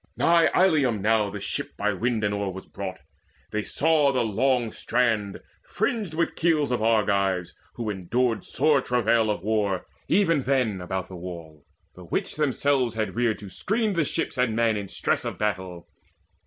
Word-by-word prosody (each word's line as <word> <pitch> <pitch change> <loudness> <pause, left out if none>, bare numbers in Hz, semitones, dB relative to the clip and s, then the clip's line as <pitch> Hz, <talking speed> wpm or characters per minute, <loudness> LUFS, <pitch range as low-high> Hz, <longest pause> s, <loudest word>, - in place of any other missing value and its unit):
Nigh 170 -1 +4
Ilium 145 - +3
now 105 0 +2
the 100 +1 -6
ship - - -4
by 105 +1 0
wind 115 +2 -1
and 105 0 +1
oar 100 -1 -2
Was 95 +1 -9
brought: 95 -2 -6 0.5
they 105 - -1
saw 150 +6 +2
the 130 -3 +1
long 120 +2 +1
strand 110 -5 0 0.2
fringed 210 -9 -2
with 170 +1 0
keels 155 -5 +1
Of 125 - 0
Argives, 100 -5 +1 0.2
who 115 - -4
endured 110 +5 -1
sore 145 -1 +2
travail 115 -3 +2
of 105 - -2
war 105 -3 0 0.2
Even 165 -7 +3
then 125 -8 0
about 95 0 -3
the 95 - -10
wall, 85 -4 -9 0.3
the - - -12
which - - -2
themselves 140 -4 +1
Had 110 -4 -2
reared 120 -2 +1
to 100 - -10
screen 215 0 0
the 170 -3 +2
ships 150 -2 -2
and 120 -3 +2
men 115 -1 +2
in 100 -1 -4
stress - - -1
Of - - -4
battle. 95 -5 -3
110 Hz, 170 wpm, -25 LUFS, 100-135 Hz, 0.5 s, Nigh